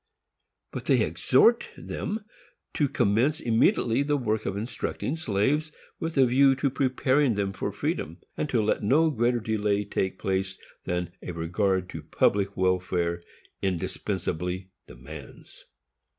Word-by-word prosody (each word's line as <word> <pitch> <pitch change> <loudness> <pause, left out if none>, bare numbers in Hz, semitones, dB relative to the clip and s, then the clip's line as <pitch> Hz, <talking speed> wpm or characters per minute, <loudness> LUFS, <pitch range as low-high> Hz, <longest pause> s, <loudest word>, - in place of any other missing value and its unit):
But - - -6
they - - +4
exhort 235 0 +3
them 210 +1 -4 0.5
to 145 -3 +1
commence 125 +12 +2
immediately 115 0 +2
the 145 +1 +1
work 110 -4 -1
of 95 - -2
instructing 120 +5 -3
slaves, 150 +3 0 0.3
with 165 -2 -3
a 135 - +7
view 135 +2 +5
to 135 +1 0
preparing 130 -1 +2
them 100 -1 -1
for - - -3
freedom; 80 +3 -3 0.2
and 150 - -2
to 115 -5 +2
let 105 - +1
no 155 +10 +3
greater 120 -2 +1
delay 105 -2 0
take 95 -1 -2
place 95 0 -1 0.3
than 90 -1 -2
"a 90 - -6
regard 90 +3 0
to - - -6
public 100 -1 +1
welfare 90 -2 0 0.4
indispensably 90 0 -2 0.2
demands." 75 -1 -12
105 Hz, 135 wpm, -27 LUFS, 95-135 Hz, 0.5 s, a